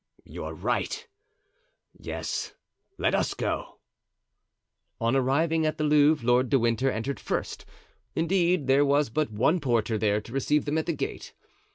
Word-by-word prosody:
"You're -, -, -7 dB
right; 455 Hz, +2 st, -2 dB, 0.9 s
yes, -, -, -5 dB, 0.4 s
let -, -, +1 dB
us -, -, 0 dB
go." -, -, -3 dB, 1.2 s
On 115 Hz, +2 st, +1 dB
arriving 155 Hz, +5 st, +2 dB
at 155 Hz, 0 st, 0 dB
the 155 Hz, -, -1 dB
Louvre 150 Hz, -3 st, +4 dB
Lord 125 Hz, +1 st, +3 dB
de 135 Hz, -, +4 dB
Winter 120 Hz, +2 st, +1 dB
entered 130 Hz, +4 st, -3 dB
first; -, -, -4 dB, 0.5 s
indeed, 175 Hz, -1 st, +2 dB
there 135 Hz, +2 st, +4 dB
was 145 Hz, -2 st, +2 dB
but 150 Hz, 0 st, 0 dB
one 130 Hz, -, +2 dB
porter 115 Hz, -5 st, 0 dB
there 105 Hz, -1 st, +2 dB
to 115 Hz, +3 st, -12 dB
receive 145 Hz, +3 st, +1 dB
them 150 Hz, +2 st, 0 dB
at 160 Hz, -, -4 dB
the 170 Hz, -, +1 dB
gate. 150 Hz, -, -5 dB
140 Hz, 150 wpm, -27 LUFS, 120-155 Hz, 1.2 s, Louvre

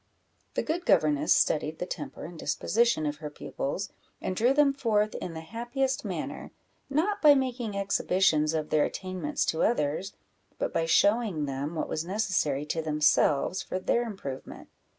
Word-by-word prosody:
The -, -, 0 dB
good 345 Hz, +3 st, -3 dB
governess 150 Hz, -1 st, +3 dB
studied 155 Hz, +1 st, +2 dB
the -, -, -3 dB
temper -, -, -6 dB
and 165 Hz, 0 st, -9 dB
disposition 235 Hz, -5 st, +1 dB
of 150 Hz, 0 st, -2 dB
her 150 Hz, -1 st, -6 dB
pupils, 150 Hz, +5 st, -4 dB, 0.3 s
and 185 Hz, -, -3 dB
drew 235 Hz, +6 st, +3 dB
them 280 Hz, 0 st, +4 dB
forth 215 Hz, -5 st, +1 dB
in 165 Hz, -, -5 dB
the 160 Hz, -, -5 dB
happiest 240 Hz, -, -2 dB
manner; -, -, -5 dB, 0.4 s
not 370 Hz, +9 st, 0 dB
by 295 Hz, -2 st, +8 dB
making 245 Hz, -5 st, -2 dB
exhibitions 180 Hz, -5 st, +2 dB
of 155 Hz, -1 st, -3 dB
their 155 Hz, -, +4 dB
attainments 185 Hz, -6 st, -3 dB
to 160 Hz, -, 0 dB
others, 180 Hz, -3 st, 0 dB, 0.4 s
but -, -, -2 dB
by 165 Hz, -, 0 dB
showing 200 Hz, -4 st, +3 dB
them 140 Hz, +4 st, -4 dB
what 155 Hz, -, -2 dB
was 155 Hz, -, -2 dB
necessary 180 Hz, -7 st, 0 dB
to 160 Hz, +2 st, -2 dB
themselves 150 Hz, +2 st, +2 dB
for -, -, -4 dB
their 210 Hz, +5 st, +1 dB
improvement. 190 Hz, -, -7 dB
185 Hz, 160 wpm, -28 LUFS, 155-235 Hz, 0.4 s, by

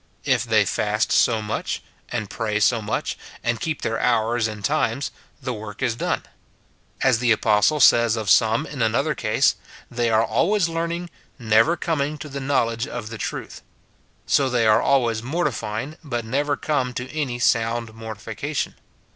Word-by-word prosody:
If -, -, +2 dB
they -, -, +3 dB
fast -, -, 0 dB
so 110 Hz, -2 st, +3 dB
much, 105 Hz, -, -3 dB, 0.3 s
and 110 Hz, -3 st, -2 dB
pray 105 Hz, 0 st, -2 dB
so 115 Hz, +2 st, +3 dB
much, 105 Hz, -, -2 dB, 0.3 s
and 115 Hz, -1 st, -1 dB
keep 160 Hz, -2 st, -3 dB
their 115 Hz, 0 st, -1 dB
hours 115 Hz, -1 st, +2 dB
and 105 Hz, -2 st, -6 dB
times, 120 Hz, +9 st, 0 dB, 0.3 s
the 130 Hz, -2 st, -3 dB
work 105 Hz, +2 st, -7 dB
is 120 Hz, -3 st, +1 dB
done. -, -, -1 dB, 0.8 s
As 115 Hz, -, +4 dB
the 120 Hz, -1 st, +2 dB
apostle 110 Hz, +7 st, +3 dB
says 115 Hz, -4 st, +5 dB
of 110 Hz, -2 st, -4 dB
some 110 Hz, +3 st, +4 dB
in 140 Hz, -4 st, -6 dB
another 130 Hz, +7 st, +1 dB
case, 110 Hz, -5 st, +2 dB, 0.2 s
" -, -, -20 dB
They 120 Hz, -1 st, 0 dB
are 110 Hz, 0 st, +3 dB
always 180 Hz, -, +2 dB
learning, 170 Hz, +1 st, -3 dB, 0.3 s
never 115 Hz, +8 st, +3 dB
coming 155 Hz, -3 st, -1 dB
to 150 Hz, 0 st, -8 dB
the 140 Hz, 0 st, -5 dB
knowledge 120 Hz, -3 st, 0 dB
of 120 Hz, -5 st, -6 dB
the 115 Hz, -, -7 dB
truth;" -, -, -5 dB, 0.6 s
so 135 Hz, -2 st, +3 dB
they 120 Hz, -2 st, +2 dB
are 110 Hz, +1 st, +5 dB
always 120 Hz, -5 st, +2 dB
mortifying, 135 Hz, -2 st, -2 dB
but 120 Hz, -6 st, -3 dB
never 145 Hz, +5 st, 0 dB
come 130 Hz, -5 st, -1 dB
to 125 Hz, +1 st, -4 dB
any 135 Hz, -6 st, -1 dB
sound 115 Hz, -1 st, +1 dB
mortification. 115 Hz, +6 st, -4 dB
120 Hz, 165 wpm, -23 LUFS, 110-140 Hz, 0.8 s, says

